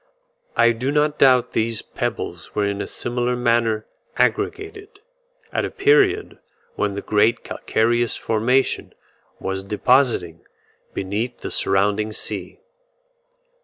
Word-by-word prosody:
I 120 - +6
do 120 +4 -2
not 150 0 +1
doubt 125 -2 +5
these 115 -1 -1
pebbles - - -5
were 105 - +1
in 100 0 -2
a - - -4
similar 120 +1 -2
manner 115 -3 +1 0.3
aggregated, 405 0 -1 0.5
at - - 0
a - - -2
period 425 -1 +2 0.3
when 105 -1 -1
the 100 - -5
great 110 +3 +2
calcareous 120 +1 0
formation 125 +5 0 0.4
was 95 0 -3
depositing 105 - +2 0.6
beneath 110 +6 -3
the - - -5
surrounding 105 +2 +1
sea. - - -5
115 Hz, 115 wpm, -22 LUFS, 105-130 Hz, 0.6 s, I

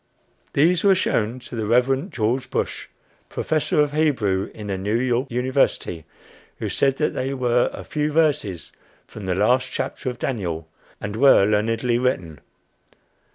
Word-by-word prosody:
These 165 +5 +3
were 195 -2 +6
shown 115 -9 0
to 120 - -9
the 110 -2 -2
Reverend 130 - +2
George 125 +3 -1
Bush, - - -3 0.4
Professor 155 -1 0
of 145 -1 +1
Hebrew 120 -12 +1
in 105 - -9
the 100 -2 -2
New 105 +3 -1
York 125 +2 0
University, 125 - 0 0.5
who - - -3
said 135 -1 +1
that 150 - 0
they 135 +1 -2
were 125 -2 +2
"a - - -8
few 150 0 -2
verses 150 - 0 0.3
from 100 -3 -9
the 90 - 0
last 125 +6 +2
chapter - - -3
of 125 - -6
Daniel" 90 -12 -3 0.3
and 100 +1 -5
were 130 -4 +6
learnedly 115 +3 +1
written. 90 - -1
125 Hz, 155 wpm, -22 LUFS, 105-135 Hz, 0.5 s, were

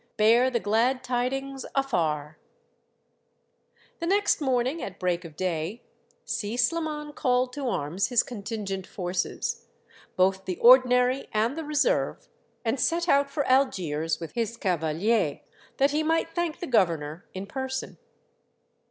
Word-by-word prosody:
Bear 230 +4 +5
the 240 -2 0
glad 230 +5 +1
tidings 270 +2 -2
afar! 160 - -1 0.8
" - - -38
The 335 - -2
next 405 -2 +2
morning, 260 +3 0
at 195 -1 -7
break 180 -1 0
of 160 -3 -11
day, 180 +5 -3 0.4
Si 215 +3 -3
Sliman 300 +3 -1
called 250 -2 +1
to 280 -1 -3
arms 170 0 -1
his 245 -3 +3
contingent 200 -4 -5
forces, 180 -1 -3 0.5
both 190 +1 +2
the 185 - -2
ordi 255 +4 +7
nary 250 +2 +2
and 220 +5 +1
the 325 - -4
reserve, 305 - 0 0.4
and 230 +4 0
set 340 +6 +1
out 280 -3 +3
for 285 0 -1
Algiers 165 - +1
with 165 -2 -7
his 230 -1 -2
cavaliers, 175 -1 0 0.4
that 275 +1 +3
he 300 +2 +1
might 325 +1 +1
thank 345 -3 -2
the - - -2
governor 170 - 0
in 190 +1 -4
person. 265 +4 -5
240 Hz, 140 wpm, -27 LUFS, 185-275 Hz, 0.8 s, ordi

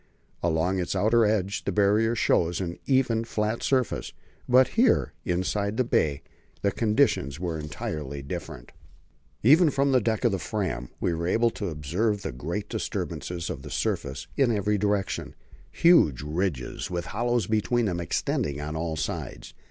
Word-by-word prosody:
Along 85 +3 +1
its 90 - -2
outer 110 +4 +4
edge 100 -2 0
the - - -1
Barrier 105 +3 +3
shows 85 -6 +2
an 85 -2 -4
even, 125 -4 +2
flat 110 0 -2
surface; 130 -3 0 0.4
but 130 +1 +6
here, 240 +3 +2
inside 100 +4 -1
the 130 - +3
bay, 75 - 0 0.4
the 100 - +3
conditions 105 - +1
were 85 -3 -3
entirely 75 -2 -5
different. 80 -3 -7 0.7
Even 155 - +6
from 140 0 +1
the 130 -2 +4
deck 110 +2 0
of 120 - +4
the 95 - -1
Fram 90 - -3
we 85 - 0
were 85 +1 -2
able 115 +5 +2
to 100 -3 -4
observe 90 +8 -1
great 85 +9 -3
disturbances 85 -2 -4
of - - -5
the - - -9
surface 70 +1 -2
in 135 -4 +3
every 105 -1 +1
direction; 100 -1 -1 0.3
huge 80 - +4
ridges 75 -4 -2
with 85 -1 -3
hollows 120 -2 +1
between 110 +3 +1
them 90 -4 -1
extended 75 -3 -1
on 75 +1 -4
all 80 0 -2
sides. 75 - -5
100 Hz, 155 wpm, -26 LUFS, 80-115 Hz, 0.7 s, but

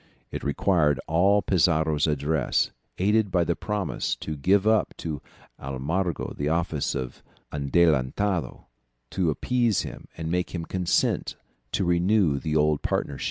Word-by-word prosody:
It - - -5
required 75 0 +2
all 95 +5 +3
Pizarro's 80 -4 +2
address, 75 -1 0 0.3
aided 105 +2 +2
by 90 -2 +2
the 85 0 0
promise 105 -5 -2
to 80 - -5
give 95 +8 +2
up 110 0 +2
to 75 -4 -5 0.4
Almagro 75 +6 -2
the 70 +1 -1
office 80 -3 -1
of 65 -2 -5 0.3
adelantado, 75 +3 +1 0.5
to 90 -4 +1
appease 120 - +1
him - - -8
and 80 0 -4
make 90 +1 -1
him 85 -1 -4
consent 90 -1 0 0.4
to 95 - +1
renew 85 -3 +2
the 80 0 -2
old 75 -1 +2
partnership. 70 -2 -2
85 Hz, 135 wpm, -26 LUFS, 75-95 Hz, 0.5 s, all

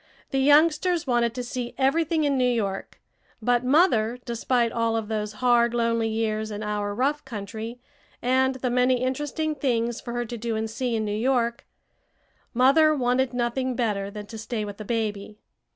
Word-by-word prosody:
The 270 - +1
youngsters 310 +5 +4
wanted 240 -3 +1
to 250 - -3
see 245 0 -5
everything 315 +4 +2
in 285 -1 +2
New 250 -1 +2
York; 200 -5 -3 0.4
but 245 +2 +1
mother, 250 -5 +3
despite 235 0 0
all 230 -1 0
of 220 -1 -4
those 210 -1 -2
hard, 235 +1 +3
lonely 230 -1 +1
years 220 -1 -1
in 210 0 -5
our 205 -1 -2
rough 285 +5 0
country 225 0 -6 0.4
and 260 +1 +2
the 255 -1 -2
many 250 0 +2
interesting 295 +4 -1
things 240 -5 -1
for 235 - -6
her 240 0 -2
to 235 +1 -6
do 230 0 -2
and 220 0 -1
see 235 +2 -2
in 220 -1 -1
New 205 - -2
York 235 0 0 0.8
mother 290 +5 +5
wanted 255 -1 +1
nothing 245 +1 -1
better 205 -5 -1
than 210 0 -8
to 220 +2 -9
stay 220 -1 -3
with 205 -1 -7
the 215 - -8
baby. 210 -2 -3
240 Hz, 175 wpm, -25 LUFS, 220-260 Hz, 0.8 s, mother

